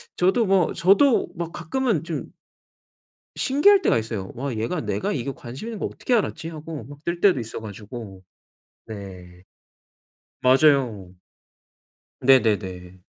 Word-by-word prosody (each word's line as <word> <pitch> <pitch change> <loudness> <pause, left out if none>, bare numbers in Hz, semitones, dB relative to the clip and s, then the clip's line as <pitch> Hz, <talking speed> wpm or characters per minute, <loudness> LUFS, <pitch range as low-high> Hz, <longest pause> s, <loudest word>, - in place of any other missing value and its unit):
저도 190 +6 +2
뭐 190 -3 +3
저도 200 +10 +4
막 170 -1 -4
가끔은 180 - -1
좀 165 -2 -4 1.1
신기할 380 +9 +4
때가 - - +3
있어요. 110 -4 -4
'와 130 +1 -4
얘가 115 +10 -2
내가 200 +6 -2
이거 135 0 -3
관심 130 - -8
있는 225 -2 -6
거 - - -4
어떻게 250 - -2
알았지?' 165 -7 -1
하고 155 -4 -7
막 145 +4 -12
뜰 170 0 -2
때도 190 -8 +4
있어 115 -1 -6
가지고. 105 -2 -9 0.7
네. 90 -4 -10 1.0
맞아요. 130 -8 +3 1.1
네네네. 95 -8 +2
140 Hz, 245 characters per minute, -23 LUFS, 110-180 Hz, 1.1 s, 저도